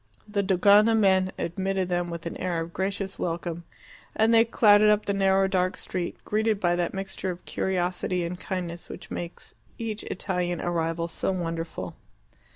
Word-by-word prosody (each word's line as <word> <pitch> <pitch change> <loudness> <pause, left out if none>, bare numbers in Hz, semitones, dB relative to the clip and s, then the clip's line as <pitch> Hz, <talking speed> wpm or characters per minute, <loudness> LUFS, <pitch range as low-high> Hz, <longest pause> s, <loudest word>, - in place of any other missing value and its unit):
The 205 -1 0
Dogana 205 +3 +5
men 190 -3 +3
admitted 190 +2 -1
them 175 -1 -1
with 170 0 -6
an 170 - -4
air 180 -2 -1
of 165 +1 -5
gracious 195 0 -3
welcome, 170 0 -3 0.5
and 220 +1 +4
they 225 0 +7
clattered 210 -2 +5
up 210 0 +3
the 200 - 0
narrow 195 0 +3
dark 185 0 0
street, 180 -2 -4
greeted 215 0 +1
by 175 -3 +2
that 175 +1 -1
mixture 195 -1 -4
of 180 0 -6
curiosity 180 -1 -1
and 175 +1 -4
kindness 175 -3 -5
which - - -9
makes 175 0 -6 0.2
each 220 -2 -4
Italian 180 -2 -2
arrival 165 -1 -1
so 170 - -1
wonderful. 165 -2 -4
185 Hz, 160 wpm, -26 LUFS, 175-200 Hz, 0.5 s, they